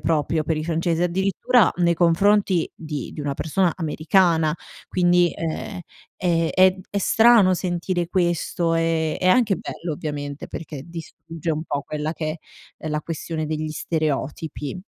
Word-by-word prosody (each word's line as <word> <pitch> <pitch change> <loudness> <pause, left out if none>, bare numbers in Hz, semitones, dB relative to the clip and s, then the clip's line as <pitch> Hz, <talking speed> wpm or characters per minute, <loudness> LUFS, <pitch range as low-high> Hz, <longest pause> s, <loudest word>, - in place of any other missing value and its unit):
proprio 155 0 0
per 160 0 0
i 155 - -2
francesi, 165 +1 0
addirittura, 190 +2 -1 0.4
nei 170 -1 +3
confronti 180 +2 +3
di 150 -4 -6
di - - -7
una 145 -1 -2
persona 175 +4 +1
americana 160 -1 +2 0.3
quindi, 175 -1 +3
ehm, 165 +2 -4 0.4
è 165 -2 +1
è 185 0 +5
è 200 - -2
strano 225 -2 +5
sentire 175 -1 -2
questo, 175 -2 0
ehm, 165 -1 0
è 185 - -2
anche 205 0 +4
bello, 170 0 -5
ovviamente, 145 -1 -5
perché 150 -4 -7
distrugge 165 0 -6
un 155 0 -2
po' 140 - -2
quella 150 +2 -3
che 155 0 -4 0.4
è, - - -15
ehm, 155 - -2
la 150 0 -1
questione 160 0 -4
degli 155 0 -3
stereotipi. 155 +1 -3
165 Hz, 150 wpm, -23 LUFS, 155-180 Hz, 0.4 s, è